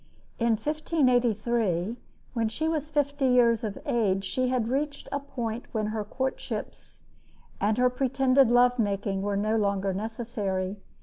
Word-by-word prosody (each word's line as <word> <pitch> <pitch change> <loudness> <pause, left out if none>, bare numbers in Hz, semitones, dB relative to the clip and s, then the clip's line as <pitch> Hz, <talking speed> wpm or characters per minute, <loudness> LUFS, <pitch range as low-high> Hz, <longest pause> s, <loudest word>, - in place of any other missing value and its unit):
In 235 -1 +3
1583, 235 - +1 0.4
when 230 -3 0
she 315 +8 -2
was 310 -2 -1
fifty 285 -2 +1
years 235 -3 +4
of 210 -3 -3
age, 195 -5 +1
she 255 +6 0
had 250 -3 0
reached 285 +3 -2
a 280 - -1
point 240 -4 -5
when 215 -2 0
her 215 -1 -2
courtships 260 +5 -5 0.6
and 210 +2 +1
her 250 0 +3
pretended 265 0 +3
love 245 +1 +4
making 200 -2 0
were 200 0 -1
no 215 +2 +1
longer 200 -2 0
necessary. 205 -3 -3
235 Hz, 140 wpm, -27 LUFS, 210-260 Hz, 0.6 s, years